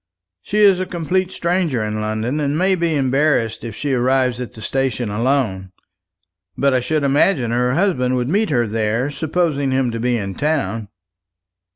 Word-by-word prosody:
She 205 - -3
is 200 -3 +5
a 185 - -2
complete 180 +1 -1
stranger 170 -10 0
in 105 0 -3
London, 110 +6 -2
and 145 0 0
may 190 +3 +2
be 170 -3 0
embarrassed 135 -4 +1
if 115 -3 -6
she 145 +1 -2
arrives 125 0 +1
at 125 - -6
the 115 - -12
station 125 -5 -1
alone. 105 -5 -1 0.9
But 140 -1 +2
I 130 - +3
should 155 +4 -1
imagine 140 -3 +2
her 125 +2 +1
husband 155 -9 +1
would 125 -1 -1
meet 205 +8 +1
her 120 -5 +2
there 115 +5 -1
supposing 155 -2 -1
him 130 -2 +1
to 115 - -4
be 120 +1 +1
in 100 -3 -4
town." 115 -7 -1
130 Hz, 175 wpm, -19 LUFS, 115-155 Hz, 0.9 s, is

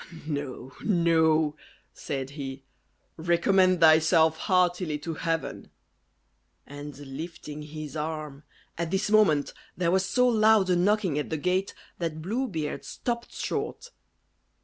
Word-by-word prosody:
"No, 140 -4 -5
no," 160 -5 +3 0.4
said 135 -1 -5
he; 135 -2 -7 0.5
"recommend 180 +2 +3
thyself 160 0 +5
heartily 180 -3 +1
to 165 +2 -5
Heaven." 165 -1 -3 1.0
And 145 0 -9
lifting 150 +2 -8
his 150 0 -8
arm 150 -2 -4 0.4
At 170 -1 -1
this 190 +3 -1
moment 175 -10 +4 0.2
there 170 -1 +1
was 190 +1 +3
so 250 +7 +2
loud 215 -4 +4
a - - +4
knocking 185 -4 +2
at 150 - -4
the 160 - -1
gate, 185 +5 -1 0.2
that 165 -2 -3
Blue 235 +9 -1
Beard 160 -8 -4
stopped 235 -1 -4
short. 485 - -4
165 Hz, 125 wpm, -27 LUFS, 150-185 Hz, 1.0 s, thyself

